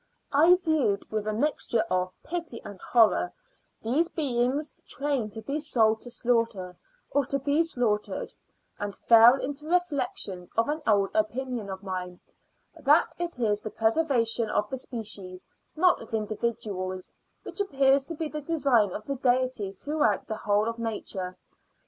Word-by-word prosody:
I 325 +6 +7
viewed, 315 - 0
with 215 -1 -2
a - - +1
mixture 235 -1 0
of 185 0 +1
pity 335 -7 -4
and 200 -2 -9
horror, 215 -6 +3 0.5
these 275 +10 +2
beings 275 0 0
training 275 -6 -1
to 220 +1 -8
be 280 +7 -2
sold 225 -7 +2
to 245 - -5
slaughter, 230 -7 0 0.4
or 285 -2 +1 0.2
be 290 +3 +3
slaughtered, 245 -10 -1 0.5
and 205 -1 -4
fell 230 +2 +7
into 285 +2 -5
reflections 280 - -1
on 230 +6 +2
an 310 +1 -3
old 200 -3 +3
opinion 235 0 -1
of 190 +1 -6
mine, 180 -2 -5 0.6
that 300 0 +3
it 345 -4 -3
is 210 -4 +1
the 215 - -6
preservation 230 -1 +1
of 210 - 0
the 265 - -1
species, 210 -7 -4 0.3
not 360 +3 +3
of 225 0 -5
individuals, 205 -4 -3 0.3
which - - -4
appears 275 -7 +3
to 330 - -5
be 315 +1 -3
the 300 0 -5
design 275 - +2
of 215 - -6
the 275 -1 -3
Deity 250 -5 +1
throughout 285 +1 0
the 220 - -4
whole 210 0 +1
of 230 0 -3
Nature. 195 -5 -4
235 Hz, 150 wpm, -27 LUFS, 210-285 Hz, 0.6 s, I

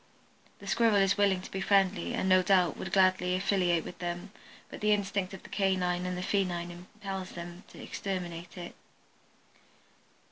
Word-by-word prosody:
The 200 - -13
Squirrel 225 +2 +3
is 195 -1 +4
willing 200 -3 +2
to - - -9
be 195 - -3
friendly, 195 0 +2
and - - -1
no 185 0 +6
doubt 180 -3 +3
would - - -6
gladly 185 -1 +3
affiliate 185 -3 +1
with - - -9
them, 175 +2 -4 0.4
but - - -10
the 210 0 +4
instinct 200 -2 -1
of 190 - -9
the - - -12
canine 180 -2 0
and 180 0 -3
the 180 - -3
feline 180 -3 -1
impels 190 +1 -7
them 175 +2 -8
to - - -14
exterminate 175 -3 -5
it. 175 -1 -7
185 Hz, 170 wpm, -30 LUFS, 180-195 Hz, 0.4 s, no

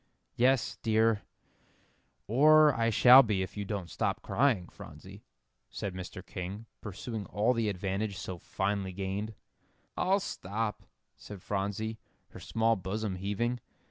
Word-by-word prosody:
"Yes, 130 0 +2
dear; 110 -1 +2 1.0
or 150 +5 +6
I 115 -1 +1
shall 125 +4 +9
be 105 -6 0
if 95 - -8
you 100 -1 -4
don't 100 -3 -4
stop - - -2
crying, 120 -9 +1
Phronsie," - - -12 0.5
said 100 - -5
Mr. 90 0 -8
King, 95 +4 -6 0.2
pursuing 105 0 -6
all 110 +7 +1
the 115 -3 0
advantage 100 +1 -2
so 90 -1 -6
finely 95 0 -2
gained. 100 +3 -4 0.6
"I'll 195 +2 +2
stop," 105 - -3 0.4
said 100 -3 -10
Phronsie, 105 +2 -3 0.3
her - - -11
small 115 0 +1
bosom 95 +1 -3
heaving. 105 +6 -1
105 Hz, 130 wpm, -30 LUFS, 95-115 Hz, 1.0 s, shall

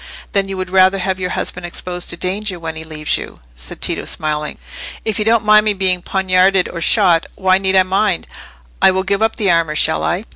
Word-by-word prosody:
"Then 195 -1 0
you 195 - -4
would 185 -1 -5
rather 190 +1 +5
have 190 0 -2
your 180 -1 -2
husband 180 0 -3
exposed 175 +1 -5
to 170 - -3
danger, 190 +1 -3
when 165 -1 -5
he 160 - -6
leaves 155 -1 -2
you?" - - -10 0.2
said - - -7
Tito, - - -2
smiling. 150 -1 -3 0.5
"If 220 -2 -2
you 210 - 0
don't 225 -1 +2
mind 215 0 +6
my 210 - +3
being 185 -2 +1
poniarded 190 0 +2
or 170 - -7
shot, 180 -4 +3
why 190 -1 +2
need 190 0 0
I 190 - +6
mind? 190 0 0 0.6
I - - +7
will 190 0 0
give 200 +2 -1
up 220 0 +1
the 205 -5 +1
armour—shall 160 -1 +1
I?" 185 +6 -1
185 Hz, 215 wpm, -17 LUFS, 175-195 Hz, 0.6 s, I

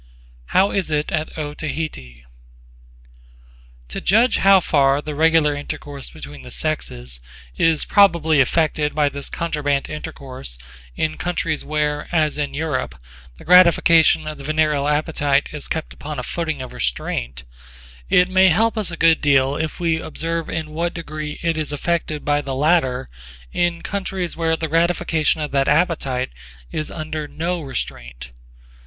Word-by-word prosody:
J.B.) - - -27
How 195 +2 +3
is 190 -4 -1
it 150 -1 -1
at 155 0 -3
Otaheite? 145 - -5 1.7
To - - -5
judge 225 +6 +4
how 195 0 +6
far 140 -5 +3
the 150 0 -5
regular 160 0 +3
intercourse 145 -1 -6
between 70 -1 -10
the 65 - -11
sexes - - -2 0.4
is 165 -2 +3
probably 170 -7 +4
affected 150 +2 +1
by 150 -1 +3
this 140 0 -6
contraband 145 -4 -1
intercourse 130 - -6 0.4
in 155 0 -1
countries 170 -3 -2
where, 150 -1 -1
as 155 -3 +1
in 145 - -2
Europe, 150 -2 -2 0.4
the - - -15
gratification 170 -3 +6
of 155 -1 -6
the - - -9
venereal 150 -1 +1
appetite 150 -1 +1
is 150 -1 -2
kept 160 0 -4
upon 150 0 -7
a - - -3
footing 160 -5 -3
of 130 - -9
restraint, 60 +1 -3 0.7
it 180 0 +5
may 190 0 +5
help 220 +6 +2
us 210 - -1
a 170 - -6
good 165 -1 +4
deal 140 -1 +3
if 155 +2 -3
we 165 -2 0
observe 165 +1 -3
in 155 -1 -4
what 170 +2 -2
degree 155 -2 -5
it 165 -1 0
is 155 -1 -3
affected 155 0 -2
by 145 0 +2
the 135 -2 -4
latter 135 -3 +2 0.5
in 175 -1 0
countries 190 -3 -3
where 165 -1 0
the 160 - -2
gratification 165 -1 +1
of 150 - -3
that 135 0 +1
appetite 150 - +1 0.4
is 155 - -3
under 155 -1 -5
no 170 +3 -3
restraint. 60 - -6
155 Hz, 150 wpm, -21 LUFS, 140-165 Hz, 1.7 s, how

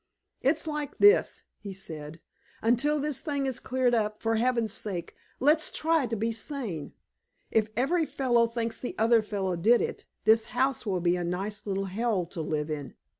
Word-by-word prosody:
"It's 290 +5 +1
like 300 -2 -4
this," 410 +3 +5 0.2
he 200 -2 -7
said, 160 -4 -8 0.4
"until 245 +7 +2
this 290 -2 -2
thing 285 -4 -2
is 260 -2 -2
cleared 255 -1 +1
up, 215 -2 0
for 225 0 0
Heaven's 235 -3 +1
sake, 195 -6 -4 0.3
let's 305 +4 +3
try 320 -4 +1
to 230 - -2
be 225 +2 0
sane! 225 - -5 0.6
If 220 -1 +3
every 320 +6 +2
fellow 240 -3 +2
thinks 230 -1 -3
the 250 - -5
other 225 +1 +4
fellow 195 -4 -2
did 225 +8 +4
it, - - -4 0.2
this 220 0 +5
house 265 -3 +1
will 185 -3 0
be 175 +1 +2
a 175 - -2
nice 195 +5 -3
little 195 0 -1
hell 200 -1 0
to 170 0 -6
live 155 0 -2
in. 145 -3 -5
225 Hz, 175 wpm, -28 LUFS, 195-260 Hz, 0.6 s, this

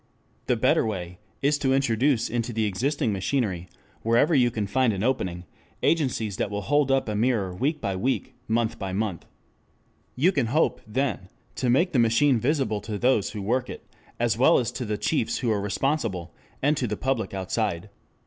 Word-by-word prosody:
The - - +3
better - - +3
way 90 -4 -4 0.2
is 145 +1 +2
to 135 -2 +2
introduce 130 -1 +2
into 120 0 -2
the 110 -1 0
existing 115 +3 0
machinery, 95 -4 -1 0.3
wherever 115 +8 +3
you 125 -4 +4
can 110 -3 -2
find 125 +3 +2
an 95 +1 -3
opening, 95 -9 -1 0.4
agencies 125 - +1
that - - -1
will 105 0 -4
hold 145 +3 +2
up 135 -2 +2
a 105 - -2
mirror 105 -4 +1
week 145 - -1
by 100 -6 -2
week, 125 +8 -1
month 115 0 0
by 95 -2 -4
month. 100 -4 -3 0.9
You 160 +9 +3
can 135 -10 0
hope, 150 +8 +1
then, 120 -5 -2 0.2
to 125 - -1
make 170 +9 +3
the 130 - +2
machine 115 +3 +4
visible 125 -5 0
to 105 +1 -4
those 110 -2 +1
who 105 -2 -5
work 125 +5 0
it, - - -8 0.3
as 120 -1 +1
well 160 +6 +6
as 120 - 0
to 125 - -4
the 105 -1 -2
chiefs 105 +2 0
who 120 - 0
are 105 -2 0
responsible, 105 - -1 0.3
and 145 +2 +3
to 125 - 0
the 105 -1 -3
public 130 -6 -1
outside. 95 0 -2
115 Hz, 185 wpm, -25 LUFS, 105-135 Hz, 0.9 s, well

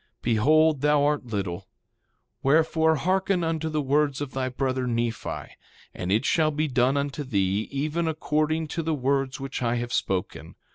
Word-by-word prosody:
Behold, 150 +6 +3
thou 150 0 +3
art 145 -3 0
little; 95 -4 -4 0.7
wherefore 160 +2 +3
hearken 185 +3 +1
unto 160 -1 -1
the 155 -1 -1
words 145 0 +1
of 145 -2 -4
thy 130 -1 -2
brother, 130 0 -1
Nephi, 115 -1 -3 0.4
and 90 +1 -4
it 110 +6 +2
shall 155 0 +3
be 155 +1 -1
done 130 +1 +2
unto 140 +1 -2
thee 100 -4 0
even 155 +4 -1
according 155 0 0
to 165 - -2
the 160 -1 -1
words 135 0 0
which 135 -1 -5
I 120 -1 +1
have 120 0 -3
spoken. 95 -2 -2
140 Hz, 160 wpm, -26 LUFS, 125-155 Hz, 0.7 s, Behold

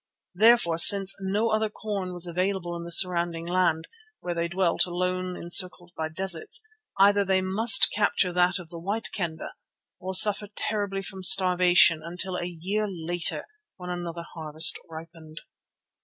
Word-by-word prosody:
Therefore, 205 -4 +2
since 195 +2 +6
no 205 +4 -2
other 215 0 -1
corn 205 -4 -6
was 175 -1 -3
available 180 0 -4
in 170 0 -8
the 170 - -9
surrounding 170 -2 +2
land, 175 -3 -1 0.3
where 175 - -6
they 170 0 -3
dwelt 175 0 -1
alone 180 +1 -4
encircled 175 0 0
by 160 0 -5
deserts, 190 - 0 0.3
either 200 +1 +3
they 190 -1 0
must 220 +7 +3
capture 195 -3 -1
that 180 +1 +1
of 175 -3 -12
the 170 -1 -10
White 205 +6 -5
Kendah, 170 -5 -6 0.5
or 190 +1 -6
suffer 205 +2 +4
terribly 200 -2 -4
from 190 -1 -9
starvation 180 -3 +4
until 180 +2 -4
a 175 - -5
year 190 +5 -4
later 175 -1 -2 0.3
when 180 -1 -8
another 170 -1 -7
harvest 160 0 +3
ripened. 160 0 -13
180 Hz, 150 wpm, -24 LUFS, 170-195 Hz, 0.5 s, since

